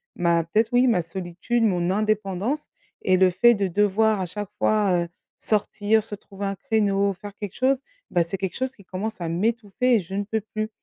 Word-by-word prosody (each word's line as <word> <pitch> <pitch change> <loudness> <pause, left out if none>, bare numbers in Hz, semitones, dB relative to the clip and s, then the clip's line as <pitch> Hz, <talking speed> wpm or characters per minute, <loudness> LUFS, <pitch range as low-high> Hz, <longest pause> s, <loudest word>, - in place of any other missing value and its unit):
ma 170 -2 +2
peut-être, 220 +6 +1
oui, 250 +1 +5
ma 185 -7 +3
solitude, 185 +7 -2
mon 180 -4 +2
indépendance 215 +6 -1 0.4
et 185 0 +5
le 185 0 +5
fait 240 +7 +5
de 200 -2 0
devoir 210 +3 +2
à 185 - -1
chaque 200 +3 -5
fois, 195 -5 +2
heu, - - -6 0.3
sortir, 215 0 +1
se 210 -1 -5
trouver 200 0 -7
un 195 - -2
créneau, 200 -1 +1
faire 205 +2 -10
quelque 205 -3 -6
chose, 265 +1 +2 0.3
bah, 175 - +2
c'est 180 +4 -4
quelque 190 -1 -3
chose 260 0 -2
qui 200 - -17
commence 195 +2 -5
à 165 - -2
m'étouffer 225 +6 +1
et - - +4
je 190 +2 -7
ne 205 - 0
peux 220 +1 -2
plus. 215 +1 -4
205 Hz, 205 wpm, -24 LUFS, 185-220 Hz, 0.4 s, oui